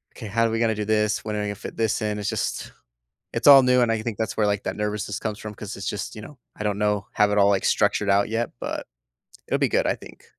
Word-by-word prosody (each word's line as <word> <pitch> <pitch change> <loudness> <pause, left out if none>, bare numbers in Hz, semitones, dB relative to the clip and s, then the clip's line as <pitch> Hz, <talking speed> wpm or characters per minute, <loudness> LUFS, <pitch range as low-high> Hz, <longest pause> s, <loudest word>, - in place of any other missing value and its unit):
Okay, 110 - -8
how 115 +3 +1
are - - +1
we 115 - -1
gonna 115 -1 +2
do 105 0 -3
this, 105 -1 +1
when 105 -1 -3
are - - -1
we 105 - -2
gonna 105 - -3
fit - - -9
this 110 -1 0
in?” 105 -1 -1
it's 105 - -2
just - - -3 0.6
it's - - -2
all 135 -2 +10
new, 125 0 +4
and 120 -2 +3
I 110 -1 0
think 115 -2 -4
that's 110 -3 -2
where, 105 -1 +2
like, 100 0 -1
that - - -3
nervousness 105 -1 -3
comes 105 -2 -4
from 110 -1 -7
'cause 105 -1 -7
it's 100 - -5
just, 105 - -4
you 105 - -7
know 145 +4 -12 0.2
I 105 - -5
don't 105 -1 0
know, 105 -1 0
have 105 0 +3
it 105 - +1
all, 100 0 +5
like, 100 -2 +1
structured 105 -1 +2
out 100 +1 +3
yet, 115 +1 -1
but - - -4 0.6
it'll - - 0
be - - +3
good, - - +1
I - - +2
think. - - -14
105 Hz, 290 wpm, -24 LUFS, 105-115 Hz, 0.6 s, all